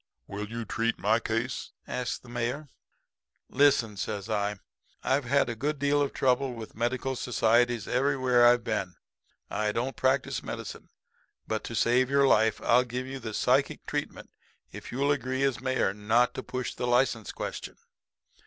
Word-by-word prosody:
"'Will 105 +1 -6
you 115 0 -5
treat 115 +2 -1
my 110 +3 +2
case?' 115 +2 -3
asks 125 -1 -3
the - - -19
Mayor. 120 +5 -3 0.8
"'Listen,' 140 -6 +3
says 105 +2 -4
I. 105 -1 0 0.5
'I've 135 +1 +1
had 140 +2 +2
a 120 - -3
good 150 +6 -2
deal 145 +1 +2
of 140 - 0
trouble 130 -1 +1
with 110 -1 -8
medical 125 +3 -1
societies 120 -2 +2
everywhere 130 -2 +2
I've 120 0 +4
been. 90 -6 -2 0.6
I 105 -1 0
don't 120 +4 -2
practice 130 +3 +1
medicine. - - -7 0.6
But, 110 0 -2
to 115 - -5
save 125 +3 +3
your 140 0 +4
life, 110 -2 +3
I'll 125 +2 +5
give 125 +1 -4
you 135 +1 -6
the 110 -4 -6
psychic 135 +3 +1
treatment - - -4 0.4
if - - -9
you'll 140 +3 +1
agree 130 -1 -1
as 135 -4 0
mayor 130 -7 +1
not 110 +4 +2
to - - -4
push 130 -1 -4
the 125 - -3
license 120 -3 +1
question.' - - -6
120 Hz, 160 wpm, -28 LUFS, 115-130 Hz, 0.8 s, I'll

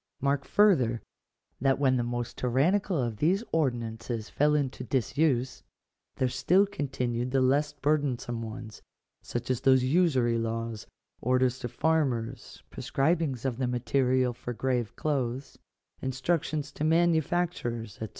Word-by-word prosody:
Mark 140 0 0
farther, 135 - +3 0.6
that 135 +1 +2
when 135 -2 +3
the 120 - +1
most 120 0 -3
tyrannical 165 +10 +1
of 120 -5 -1
these 185 - +2
ordinances 120 -6 -2
fell 150 +1 +3
into 135 -3 -1
disuse, 130 0 0 0.5
there 130 - +1
still 160 +10 +3
continued 130 -9 -2
the 135 +1 +2
less 140 +3 +2
burdensome 140 -5 -1
ones, 110 -1 -8 0.4
such 120 +1 -4
as 130 -1 -1
those 130 -1 +4
usury 130 -6 +2
laws, 115 -1 -3 0.3
orders 130 +1 +2
to 120 - -4
farmers, 130 -3 -1
prescribings 140 -2 0
of 125 -3 -1
the 130 -1 0
material 125 0 +1
for 120 +1 -6
grave 125 -2 -1
clothes, 135 -3 -2 0.4
instruc 135 +5 0
tions 145 -2 -4
to 145 - -5
manufacturers, 160 - 0
&c. 110 - -4
130 Hz, 130 wpm, -28 LUFS, 120-150 Hz, 0.6 s, those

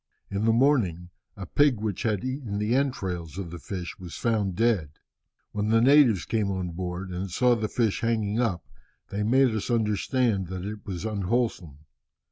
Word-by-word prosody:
In 100 +2 -1
the 115 - +5
morning, 110 - +2 0.3
a 95 - -6
pig 140 +3 +3
which 105 -3 -3
had 110 -3 0
eaten 130 -6 -3
the 105 +3 0
entrails 95 - -1
of 90 -4 -5
the 85 - -7
fish 85 -3 -6
was 90 -2 -8
found 105 -6 0
dead. 100 -10 +1 0.6
When 105 +1 -1
the 115 +1 +5
natives 125 - +5
came 110 -3 0
on 95 -2 -2
board, 90 +2 -5
and 90 +2 -4
saw 125 +7 +3
the 110 -2 -2
fish 115 -3 0
hanging 110 -2 0
up, 110 -8 0 0.5
they 100 - -2
made 125 +3 +3
us 110 +2 -3
understand 110 -2 +1
that 95 +1 -5
it 105 0 -7
was 95 0 -4
unwholesome. 100 - -2
105 Hz, 175 wpm, -26 LUFS, 90-115 Hz, 0.6 s, the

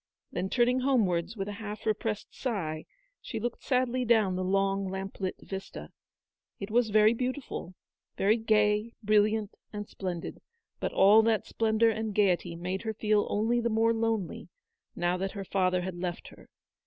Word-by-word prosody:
Then 190 - -2
turning 250 +2 +3
home 255 -4 +3
wards 180 +5 -2
with 195 0 -3
a - - -3
half 210 0 -6
repressed 215 -1 -2
sigh, 170 - -3 0.4
she 225 - -5
looked 240 +2 -4
sadly 255 -1 +1
down 220 -6 +3
the 185 - -1
long 195 +1 +1
lamp 190 +1 -6
lit 190 -2 -2
vista. 195 0 -7 0.7
It 200 +1 -6
was 235 0 +3
very 215 +1 +5
beauti 255 +4 -2
ful, 180 -5 -7 0.4
very 210 +4 +3
gay, 215 0 +2
brilliant, 210 0 +2 0.2
and 205 -1 -6
splendid; 180 -3 -5 0.4
but - - -2
all 205 +3 +6
that 220 -1 +1
splendour 225 0 +2
and 220 -1 -3
gaiety 180 -4 +2
made 180 +3 -3
her 220 -1 -4
feel 210 -1 +2
only 230 +3 +1
the 235 - 0
more 225 +1 +3
lonely, 225 -4 -2 0.5
now 175 +1 0
that 190 +1 -3
her 200 -2 -6
father 185 -1 +1
had 185 +1 -4
left 175 -1 -4
her. - - -17
210 Hz, 170 wpm, -29 LUFS, 190-225 Hz, 0.7 s, all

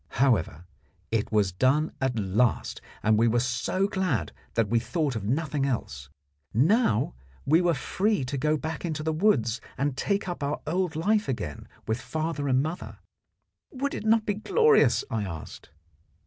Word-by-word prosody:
However, 95 - +2 0.5
it 115 -2 0
was 105 -3 +2
done 130 - +2
at 130 -3 0
last, 105 +3 0 0.2
and 110 0 +4
we 115 - +4
were 120 +1 +2
so 130 +10 0
glad 180 - -1 0.2
that 115 -2 +2
we 115 +3 +2
thought 145 +2 -1
of 105 -3 -4
nothing 145 +4 0
else. 70 - -3 0.5
Now 145 - +3 0.3
we 160 +5 +4
were 175 -2 +2
free 190 +3 0
to 125 - -4
go 150 +3 +1
back 160 +1 -5
into 155 -3 -3
the 160 0 0
woods 140 - +2 0.2
and 140 0 0
take 200 +8 -1
up 175 -3 -4
our 145 +1 -1
old 175 +1 -1
life 210 +6 +1
again 85 - -4 0.2
with 110 +2 -1
father 155 -1 -3
and 130 0 +3
mother. 160 +3 -5 0.7
Would 280 +1 -3
it - - -4
not 220 0 +4
be 205 - +1
glorious, 440 - +3
I 110 -2 -1
asked? 85 -5 -8
140 Hz, 165 wpm, -27 LUFS, 115-175 Hz, 0.7 s, and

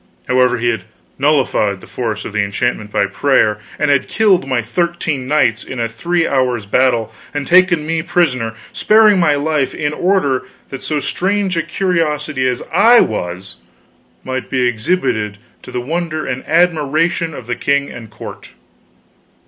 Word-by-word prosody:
However 125 0 +3
he 120 0 0
had 110 -5 -2 0.3
nullified 135 -9 +1
the - - -14
force 110 -4 -4
of - - -7
the 105 - +1
enchantment 105 +1 -2
by 100 - +2
prayer, 105 0 +1 0.2
and 150 -1 +1
had 140 -2 +2
killed 195 -10 +2
my 130 -3 0
thirteen 160 0 -2
knights 125 -6 +2
in 130 - -7
a 115 - 0
three 170 +9 -1
hours' 125 -5 0
battle, 115 0 +1 0.2
and 145 -1 -2
taken 175 -1 +4
me 165 0 -1
prisoner, 125 -10 0 0.2
sparing 215 -2 +5
my 155 -4 +3
life 145 -1 -1
in 150 0 -2
order 175 -8 +1 0.2
that 135 - -7
so 150 -1 -2
strange 190 +6 -1
a 165 - +1
curiosity 155 -7 -1
as 125 -1 -2
I 230 +7 +6
was 90 -2 -3 0.7
might 130 -1 -4
be 130 - 0
exhibited 110 - -1 0.2
to - - -11
the 125 - -2
wonder 155 +3 -3
and 130 - -4
admiration 165 0 +1
of 125 - -9
the 120 0 -2
king 140 +2 0
and 115 -2 -9
the - - -24
court. - - -10
140 Hz, 165 wpm, -17 LUFS, 120-165 Hz, 0.7 s, I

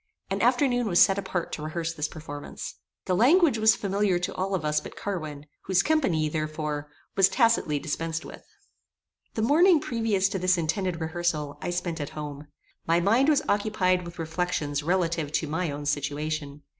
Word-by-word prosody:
An - - -1
afternoon 245 -5 +2
was 175 -3 +3
set 195 0 +5
apart 180 -3 -3
to - - -5
rehearse 165 +2 -3
this 150 -2 -2
performance. 145 -2 -8 0.3
The 185 - 0
language 275 - +4
was 220 0 +5
familiar 200 -2 0
to 175 - -3
all 190 +1 -1
of 165 -5 -3
us 150 0 +2
but - - -10
Carwin, 155 -7 -5 0.2
whose 185 -2 +3
company, 195 - +2
therefore, 150 -1 -3 0.3
was 195 -1 +5
tacitly 225 - +2
dispensed 165 +2 -3
with. - - -11 0.9
The 220 - 0
morning 325 +7 +5
previous 225 -8 0
to 195 - -3
this 185 0 +3
intended 170 +1 -1
rehearsal, 160 -3 -2
I - - -3
spent 175 -2 -2
at 145 - -4
home. 145 -1 -6 0.4
My 165 +1 +4
mind 230 - +3
was 300 - +3
occupied 200 -3 +1
with 170 0 -9
reflections 160 -3 -2
relative 165 -2 0
to 155 - 0
my 160 +3 -1
own 145 +1 -5
situation. 145 0 -3
175 Hz, 170 wpm, -26 LUFS, 155-200 Hz, 0.9 s, set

